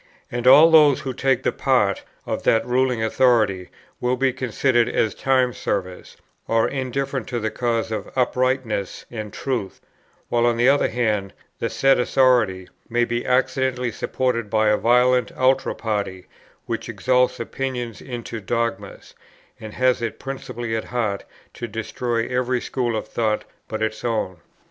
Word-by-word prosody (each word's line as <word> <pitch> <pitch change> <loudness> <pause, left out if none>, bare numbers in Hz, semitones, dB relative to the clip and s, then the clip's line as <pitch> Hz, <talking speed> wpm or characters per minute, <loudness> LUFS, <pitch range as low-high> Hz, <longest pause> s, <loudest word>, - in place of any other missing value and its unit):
And 120 +1 -2
all 150 +5 +8
those 150 -4 +6
who 130 - -4
take 130 0 +1
the - - +2
part - - +1 0.2
of - - -3
that 115 - +2
ruling 125 -2 +1
authority 110 -6 +2 0.3
will 125 +1 +1
be 135 0 +1
considered 125 -1 +1
as 110 - 0
time 130 -2 +1
servers, 90 -5 -4 0.3
or 115 0 +2
indifferent 135 0 -3
to 120 -2 -2
the 110 -1 -2
cause 115 -1 -1
of 105 -2 -4
uprightness 130 -5 -1
and 110 -3 -6
truth; 120 -8 -3 0.5
while, 120 0 +2
on 120 -1 +1
the 120 +2 +3
other 140 +1 +4
hand, 105 -5 -1 0.3
the - - -1
said 135 -1 +3
authority 120 -8 +2 0.2
may 120 +1 +2
be 120 +1 -3
accidentally 125 -1 +1
supported 115 -4 -2
by 110 0 +2
a 105 - +4
violent 125 -1 +3
ultra 130 +1 +2
party, 100 -4 -3 0.4
which - - -4
exalts 125 0 +1
opinions 120 -1 -4
into 120 -2 -6
dogmas, 105 -1 -3 0.5
and 110 -1 -9
has 130 -1 +2
it 115 -2 -3
principally 120 -4 -5
at 110 - -3
heart 110 -5 -2 0.3
to 120 - -6
destroy 115 +2 -2
every 125 0 0
school 120 -2 -2
of 110 - -4
thought 110 -1 -1 0.2
but 110 0 -3
its 110 0 -3
own. 110 -6 -1
120 Hz, 155 wpm, -22 LUFS, 110-130 Hz, 0.5 s, all